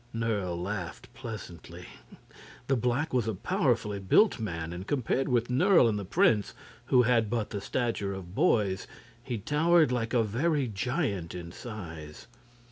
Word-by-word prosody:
Nerle 105 Hz, -6 st, -1 dB
laughed 90 Hz, -1 st, -5 dB
pleasantly. 90 Hz, -6 st, -9 dB, 0.8 s
The 135 Hz, -, +1 dB
black 125 Hz, +6 st, 0 dB
was 120 Hz, -3 st, +1 dB
a 110 Hz, -, -1 dB
powerfully 115 Hz, -, 0 dB
built 125 Hz, -, +4 dB
man, 85 Hz, -6 st, -4 dB
and 90 Hz, +3 st, -7 dB
compared 135 Hz, 0 st, 0 dB
with 120 Hz, -1 st, +1 dB
Nerle 165 Hz, +1 st, +5 dB
and 105 Hz, -2 st, 0 dB
the 100 Hz, -, -5 dB
prince, 105 Hz, +2 st, +2 dB, 0.3 s
who 125 Hz, -1 st, +4 dB
had 115 Hz, -3 st, +2 dB
but 115 Hz, -2 st, -2 dB
the 100 Hz, -2 st, -4 dB
stature 115 Hz, -3 st, -1 dB
of 95 Hz, -2 st, -7 dB
boys, 105 Hz, -, +1 dB, 0.3 s
he 120 Hz, -1 st, -4 dB
towered 155 Hz, -, +3 dB
like 120 Hz, -1 st, -1 dB
a 115 Hz, -, +4 dB
very 135 Hz, +6 st, 0 dB
giant 105 Hz, -, -2 dB
in 85 Hz, -1 st, -7 dB
size. 80 Hz, -9 st, -9 dB
115 Hz, 150 wpm, -29 LUFS, 95-125 Hz, 0.8 s, Nerle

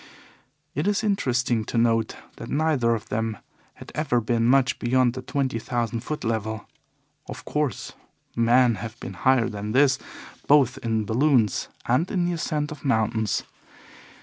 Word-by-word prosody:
It 150 Hz, +7 st, -1 dB
is 205 Hz, +1 st, +1 dB
interesting 125 Hz, -, +1 dB
to 120 Hz, -, -3 dB
note 115 Hz, -1 st, +2 dB, 0.2 s
that -, -, -8 dB
neither 140 Hz, -6 st, +2 dB
of 115 Hz, +1 st, -8 dB
them 110 Hz, -1 st, -2 dB, 0.4 s
had -, -, -12 dB
ever 140 Hz, -6 st, +1 dB
been 115 Hz, 0 st, 0 dB
much 130 Hz, -1 st, +3 dB
beyond 125 Hz, 0 st, +2 dB
the 130 Hz, -, -6 dB
twenty 130 Hz, -3 st, -2 dB
thousand 115 Hz, -1 st, -2 dB
foot 150 Hz, +6 st, -5 dB
level. 110 Hz, -2 st, -2 dB, 0.6 s
Of -, -, -8 dB
course, 150 Hz, -4 st, -2 dB, 0.4 s
men 120 Hz, 0 st, +4 dB
have 115 Hz, +1 st, -7 dB
been -, -, -7 dB
higher 130 Hz, -3 st, +2 dB
than 105 Hz, -2 st, -5 dB
this 135 Hz, 0 st, +4 dB, 0.5 s
both 140 Hz, -4 st, +4 dB
in 110 Hz, -2 st, -1 dB
balloons 120 Hz, -2 st, +2 dB, 0.2 s
and 130 Hz, +9 st, +1 dB
in 180 Hz, -4 st, 0 dB
the 175 Hz, -, 0 dB
ascent 150 Hz, -2 st, -2 dB
of 150 Hz, -, -9 dB
mountains. 110 Hz, -4 st, 0 dB
120 Hz, 150 wpm, -25 LUFS, 115-140 Hz, 0.6 s, men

